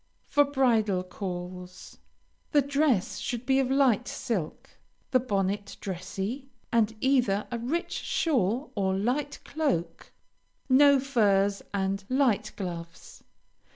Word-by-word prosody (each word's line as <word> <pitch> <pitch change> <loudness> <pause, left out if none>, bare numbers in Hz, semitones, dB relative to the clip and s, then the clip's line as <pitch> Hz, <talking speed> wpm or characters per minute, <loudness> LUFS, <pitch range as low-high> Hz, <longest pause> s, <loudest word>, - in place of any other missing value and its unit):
FOR 290 0 +3
BRIDAL 230 -9 +2
CALLS 180 -1 -7 0.5
The 290 -2 +5
dress 280 -7 +1
should 240 0 -4
be 265 +1 +3
of 260 -2 +1
light 265 -4 +3
silk, 200 -11 -4 0.4
the 255 - +5
bonnet 200 -3 -2
dressy, 195 +8 -5 0.2
and 225 -1 +2
either 245 -7 +2
a 235 - -2
rich 305 +10 -2
shawl 255 - 0
or 190 -2 0
light 255 +8 -1
cloak; 175 - -2 0.6
no 280 +1 +6
furs, 205 -7 +2
and 195 0 -1
light 245 -6 +2
gloves. 170 -3 -7
225 Hz, 115 wpm, -28 LUFS, 195-270 Hz, 0.6 s, no